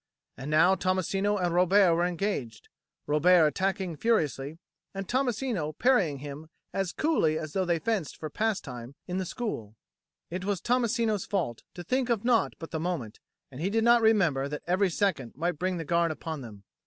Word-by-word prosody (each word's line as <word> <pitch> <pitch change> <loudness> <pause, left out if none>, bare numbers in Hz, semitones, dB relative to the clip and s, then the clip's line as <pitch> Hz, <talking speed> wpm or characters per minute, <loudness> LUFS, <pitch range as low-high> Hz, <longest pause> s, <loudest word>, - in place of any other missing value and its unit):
And 135 +3 -7
now 160 +5 +5
Tommasino 190 +2 0
and 175 -3 0
Robert 180 +1 +5
were 175 +1 +2
engaged, 170 - -3 0.4
Robert 160 +3 +5
attacking 190 +1 -1
furiously 155 - 0 0.4
and 195 -1 -4
Tommasino 240 - -1
parrying 205 - +3
him 145 +3 -8 0.2
as 195 -2 -1
coolly 230 - +1
as 155 -1 -6
though 190 -1 +1
they 170 -1 +1
fenced 205 -3 -2
for 155 - -5
pastime 140 - -3
in 180 +1 -2
the 190 - -2
school. 115 - -5 0.6
It 180 +1 -4
was 200 -1 -1
Tommasino's 235 -3 0
fault 165 - -2
to 175 - -7
think 255 +7 0
of 235 -2 0
naught 240 -2 +2
but 165 - -9
the 160 - -2
moment 155 -11 -3 0.3
and 130 +3 -8
he 185 - 0
did 225 +2 +1
not 235 0 +6
remember 175 -12 +3
that 150 0 -5
every 185 +2 +2
second 175 - -1
might 165 +2 -2
bring 185 +1 -1
the 165 - -4
guard 170 +2 +2
upon 155 0 -5
them. 105 -5 -11
180 Hz, 180 wpm, -28 LUFS, 155-205 Hz, 0.6 s, not